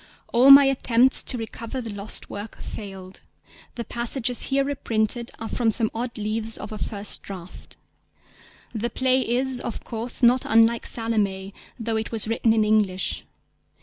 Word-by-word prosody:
All 250 +3 +5
my 275 0 +10
attempts 255 -1 +3
to 250 - 0
recover 230 +2 -6
the 230 -4 -6
lost 200 +1 -4
work 205 +2 -8
failed. 195 -2 -9 0.5
The 235 - -5
passages 240 +1 0
here 275 0 +1
reprinted 235 -4 -2
are 225 - -6
from 235 -1 0
some 220 0 +4
odd 235 +1 -4
leaves 220 +1 -2
of 210 - -8
a 215 - -6
first 205 -1 -1
draft. 185 -3 -11 1.0
The 230 +1 -2
play 260 +1 +1
is, 255 +1 0
of 235 - -6
course, 235 +2 -5
not 245 +2 +5
unlike 225 +1 +3
Salomé, 200 -4 -1 0.3
though 225 -1 -2
it 220 - -4
was 225 -2 -1
written 225 0 +1
in 220 -1 +3
English. 205 -4 0
225 Hz, 155 wpm, -24 LUFS, 215-245 Hz, 1.0 s, my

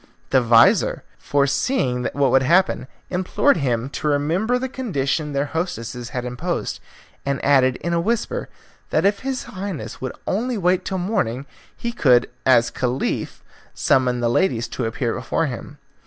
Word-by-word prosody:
The 130 - +5
vizir, 115 -1 +4 0.2
foreseeing 140 - 0
what 140 -3 +2
would 135 +1 +5
happen, 170 -1 +2 0.2
implored 185 +10 +2
him 125 -5 0
to 150 - -3
remember 165 +12 +1
the 260 +1 -2
condition 155 - -2
their 140 +1 0
hostesses 140 -8 -4
had 125 -1 -4
imposed, 155 +9 -3 0.4
and 140 -1 -1
added 130 -3 +4
in 170 +5 -3
a 170 - +2
whisper 235 - -1 0.4
that - - +1
if 200 0 +3
his 265 -1 -3
Highness 185 - -6
would 130 -1 -3
only 235 +5 -1
wait 180 -1 +1
till 190 - -2
morning 175 - -1 0.3
he 235 - -3
could 125 - +3 0.2
as 120 -2 +5
Caliph 125 +1 -2 0.3
summon 125 -2 +2
the 120 - +2
ladies 120 -5 +1
to 120 - -3
appear 115 0 -1
before 130 +6 -1
him. 140 +2 -6
140 Hz, 155 wpm, -22 LUFS, 125-185 Hz, 0.4 s, The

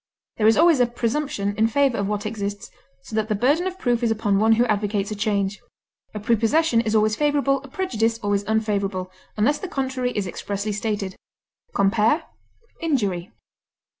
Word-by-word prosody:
There 215 - +3
is 220 - +5
always 330 -2 +5
a 245 - +4
presumption 235 -4 -2
in 220 +1 +4
favor 270 0 +2
of 200 - -1
what 205 0 -2
exists, 205 -2 -4 0.3
so 220 - -8
that 220 0 0
the 215 - +1
burden 285 - +2
of 370 0 -5
proof 245 -8 0
is 235 - +2
upon 210 -3 +1
one 220 +1 +5
who 235 +2 +3
advocates 205 -2 -1
a - - -2
change. 205 -1 -1 0.5
A - - -3
prepossession 230 +5 +2
is 220 -1 -1
always 215 0 +3
favorable, 285 -1 +1
a 275 - -12
prejudice 230 - -1
always 205 -2 -1
unfavorable, 200 -4 -1 0.3
unless 285 +8 +2
the 380 - -5
contrary 265 -5 -2
is 205 - 0
expressly 200 +3 -4
stated. 205 -3 -3 0.6
Compare 215 - +3 0.6
INJURY. 205 - -1
220 Hz, 170 wpm, -23 LUFS, 205-255 Hz, 0.6 s, is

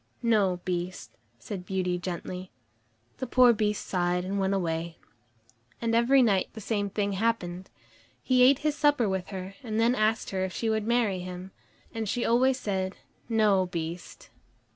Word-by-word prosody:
"No, 205 -6 +2
Beast," 180 0 -3 0.3
said 200 -5 -7
Beauty 180 -1 -1
gently. 180 +1 -5 0.7
The 260 - -4
poor 250 0 +6
Beast 210 -1 -1
sighed 180 -1 0
and 200 +2 -2
went 195 0 +1
away. 165 -2 -2 0.8
And 230 -1 -1
every 250 +3 +5
night 200 -5 +2
the 220 - -8
same 205 -1 -1
thing 205 0 -1
happened. 190 -3 -1 0.5
He 255 -1 +3
ate 260 +2 +7
his 300 -1 +2
supper 290 -6 +3
with 190 -1 -2
her, 190 -1 -6
and 220 -4 -3
then 230 +2 +4
asked 220 -2 0
her 190 -1 -1
if 190 -1 -3
she 225 -1 -1
would 220 0 -1
marry 230 -6 +1
him. 180 +1 -7 0.4
And 225 -2 -3
she 245 +1 -1
always 255 +2 +3
said, 190 -4 -2 0.3
"No, 210 -5 +3
Beast." 170 0 -6
200 Hz, 165 wpm, -28 LUFS, 185-230 Hz, 0.8 s, ate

